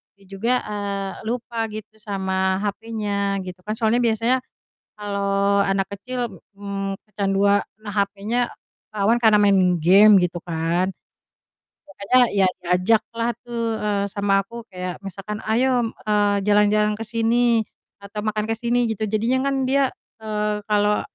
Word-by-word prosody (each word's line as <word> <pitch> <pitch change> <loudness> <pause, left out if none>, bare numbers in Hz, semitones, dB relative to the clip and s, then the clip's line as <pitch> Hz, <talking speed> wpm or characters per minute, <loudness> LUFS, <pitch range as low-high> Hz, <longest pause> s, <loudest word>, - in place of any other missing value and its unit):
dia 200 0 -23
juga, 210 +5 0
eee, 200 -2 -3 0.2
lupa 235 -1 -2
gitu 215 0 -9
sama 190 -2 -1
hapenya 205 -2 -2
gitu 180 0 -8
kan 215 - -2
soalnya 225 +1 +2
biasanya 235 +1 +2 0.6
kalau 200 -1 0
anak 195 -1 +1
kecil, 240 -2 -5 0.2
mmm, 200 -1 -4
kecandua 200 -1 +2 0.2
nah 205 - -5
hapenya 205 +4 0 0.5
rawan 215 +4 +2
karena 220 -3 +5
mainin 195 -3 +4
game 200 +5 +7
gitu 175 0 -2
kan. 170 +2 0 1.0
Makanya 255 -3 0 0.2
iya 195 - +4
diajaklah 215 +6 +1
tuh, 230 -2 -3
eee, 205 -1 0
sama 195 0 +1
aku 230 +5 -14
kayak 180 -1 -5
misalkan, 195 +2 -6
"Ayo," 245 +3 +2
mmm, 225 -1 -2
eee, 205 -1 +2
"jalan-jalan 210 0 +3
ke - - -3
sini 230 +1 +2 0.4
atau 200 +1 -7
makan 215 0 -1
ke 225 - -1
sini." 240 +1 +1
Gitu 220 0 -2
jadinya 240 +6 +1
kan 270 -1 0
dia, 270 +1 +2 0.3
eee, 210 -1 -1
kalau, 210 0 +2
210 Hz, 140 wpm, -22 LUFS, 195-225 Hz, 1.0 s, game